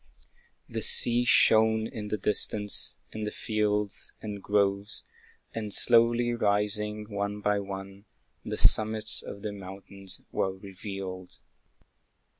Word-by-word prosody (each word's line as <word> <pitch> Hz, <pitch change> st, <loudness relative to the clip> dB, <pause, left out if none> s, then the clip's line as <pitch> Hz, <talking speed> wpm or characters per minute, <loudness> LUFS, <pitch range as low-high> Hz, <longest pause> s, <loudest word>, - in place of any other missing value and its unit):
The -, -, -6 dB
sea 120 Hz, +1 st, +7 dB
shone 110 Hz, -2 st, +3 dB
in 105 Hz, -1 st, -8 dB
the 105 Hz, -, -3 dB
distance, 105 Hz, +1 st, +2 dB, 0.2 s
and 110 Hz, -, -6 dB
the 105 Hz, -, -3 dB
fields 105 Hz, -2 st, -3 dB
And 105 Hz, -2 st, -8 dB
groves; 100 Hz, 0 st, -2 dB, 0.5 s
and 110 Hz, -2 st, -6 dB
slowly 120 Hz, +2 st, +4 dB
rising, 105 Hz, -1 st, -2 dB
one 100 Hz, 0 st, -5 dB
by 105 Hz, 0 st, -1 dB
one, 100 Hz, 0 st, -9 dB, 0.4 s
The -, -, -6 dB
summits 110 Hz, 0 st, +2 dB
of 100 Hz, -, -11 dB
the 105 Hz, -, -4 dB
mountains 95 Hz, 0 st, -9 dB
were 95 Hz, -, -2 dB
revealed. 95 Hz, -1 st, -9 dB
105 Hz, 115 wpm, -26 LUFS, 100-110 Hz, 0.5 s, sea